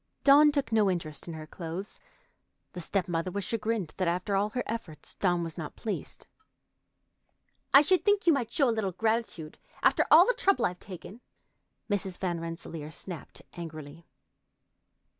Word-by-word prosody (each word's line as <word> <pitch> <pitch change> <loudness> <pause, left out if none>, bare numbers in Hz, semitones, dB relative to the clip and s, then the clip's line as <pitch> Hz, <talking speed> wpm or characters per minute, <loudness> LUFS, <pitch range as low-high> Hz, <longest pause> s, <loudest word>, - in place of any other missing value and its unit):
Dawn 290 +2 +7
took 280 -6 -1
no 215 -3 +4
interest 160 -5 -4
in 165 - -5
her 155 -1 -7
clothes. 170 +5 -7 0.7
The 180 - -6
step 190 +2 -1
mother 165 +1 -1
was 200 +2 -3
chagrined 220 -4 -2
that 185 - 0
after 180 +4 0
all 200 +2 +1
her 245 +3 -2
efforts 185 -10 -6
Dawn 175 -3 +1
was 165 +1 -6
not 155 -2 -6
pleased. 215 -3 -5 1.5
"I 275 - +8
should 370 +4 +3
think 410 -1 +2
you 335 - +6
might 240 -5 -1
show 280 - +3
a 235 - +2
little 205 -4 -1
gratitude, 220 -6 -2 0.2
after - - +4
all - - +9
the - - +2
trouble 395 -5 +2
I've 180 0 -2
taken," 195 +5 -10 0.7
Mrs. 195 -3 -2
Van 175 -3 -2
Rensselaer 165 -2 -6
snapped 165 0 -8
angrily. 160 -1 -9
190 Hz, 160 wpm, -29 LUFS, 165-230 Hz, 1.5 s, all